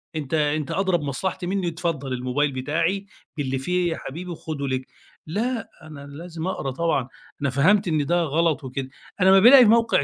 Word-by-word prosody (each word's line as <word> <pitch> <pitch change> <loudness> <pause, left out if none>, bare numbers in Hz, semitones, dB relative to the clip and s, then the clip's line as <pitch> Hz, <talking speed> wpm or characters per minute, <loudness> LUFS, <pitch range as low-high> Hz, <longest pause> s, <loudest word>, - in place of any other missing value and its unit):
أنتَ 150 -2 -5
أنتَ 150 -1 0
أدرى 190 -2 +1
بمصلحتي 150 +5 -3
مِنّي، 190 -2 -1
اتفضل 160 -5 -3
الموبايل 130 +4 0
بتاعي 165 +9 -1 0.3
باللي 135 -2 -1
فيه 180 +5 0
يا - - -3
حبيبي 170 +5 -7
خده 145 -4 -5
ليك. 130 0 -3 0.4
لأ، 225 +6 -2
أنا 150 -3 -11
لازم 165 +3 -7
أقرا 135 -7 -3
طبعًا، 140 -3 0 0.3
أنا 140 - +1
فهمت 180 +10 +3
إن 155 -3 +1
ده 175 +1 +2
غلط 160 0 0
وكده. 130 0 -5 0.3
أنا 190 - +6
أما 195 - +7
بالاقي 250 +5 +9
موقع 230 +1 +4
160 Hz, 175 wpm, -23 LUFS, 140-180 Hz, 0.4 s, بالاقي